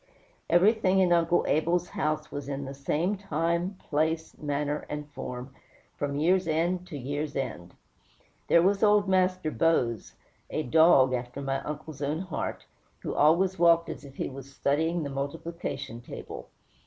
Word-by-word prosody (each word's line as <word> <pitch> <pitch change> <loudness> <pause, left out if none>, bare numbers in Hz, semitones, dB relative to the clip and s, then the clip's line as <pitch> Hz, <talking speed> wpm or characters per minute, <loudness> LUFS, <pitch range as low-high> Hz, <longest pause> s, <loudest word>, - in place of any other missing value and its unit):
Everything 195 +2 +4
in 185 -2 +4
Uncle 170 0 +3
Abel's 170 +3 +1
house 155 0 -2
was 145 -1 -5
in 140 0 -3
the 135 - -6
same 150 +8 -1
time, 170 0 -1
place, 160 +1 -1
manner, 145 0 -2
and 150 0 -5
form, 125 0 -7 0.4
from 140 -1 -2
year's 180 +5 +2
end 175 +3 0
to 150 - -6
year's 145 +2 -4
end. 110 -10 -4 0.7
There 170 - +5
was 195 +2 +2
old 210 -1 +4
Master 185 -3 +2
Bose, 125 - +1 0.3
a 155 - -2
dog 135 -2 +5
after 125 +2 -4
my 135 -1 -2
uncle's 150 0 -7
own 150 +4 -1
heart, 185 - -4 0.4
who - - -3
always 175 +5 +3
walked 170 -1 +5
as - - -7
if 140 -1 -12
he - - -2
was 135 0 -9
studying 160 +5 0
the 140 - -4
multiplication 140 -3 -5
table. - - -9
155 Hz, 155 wpm, -28 LUFS, 140-175 Hz, 0.7 s, There